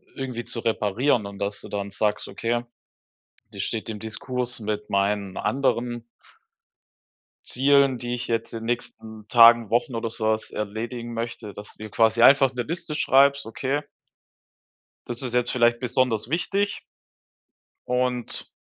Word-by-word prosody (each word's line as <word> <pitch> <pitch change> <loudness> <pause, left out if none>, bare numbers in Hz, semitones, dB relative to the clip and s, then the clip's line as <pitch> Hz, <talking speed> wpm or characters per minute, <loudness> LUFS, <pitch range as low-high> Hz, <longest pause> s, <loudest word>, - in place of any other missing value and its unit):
irgendwie 125 -3 -4
zu 115 - -3
reparieren 115 +2 +1
und 100 0 -8
dass 100 0 -3
du - - -9
dann 100 -1 -3
sagst: 105 +1 -1
„Okay, 115 +4 -1 0.9
das - - -5
steht 110 0 -3
im 105 -2 -5
Diskurs 125 +3 -4
mit 105 -1 -4
meinen 100 -1 0
anderen 120 -3 0 1.5
Zielen, 140 0 +4
die 120 0 -3
ich 125 0 -4
jetzt 115 -1 -1
in 115 -1 -5
'n - - -6
nächsten 110 -2 -4
Tagen, 115 -2 +7
Wochen 120 +2 +1
oder 115 0 -2
sowas 110 -1 -1
erledigen 115 +3 -4
möchte.“ 115 -2 -5
Dass 105 0 -9
du - - -10
dir - - -8
quasi 110 +2 +3
einfach 135 +1 +7
'ne 125 -1 -2
Liste 170 +2 -4
schreibst: 140 0 +4
„Okay“ 135 +6 -2 1.2
„das 120 -1 -5
ist 125 -3 -4
jetzt 125 0 +1
vielleicht 120 -1 +3
besonders 125 -3 0
wichtig.“ 195 +6 -1 1.1
„Und 125 -1 -1
120 Hz, 145 wpm, -25 LUFS, 110-125 Hz, 1.5 s, Tagen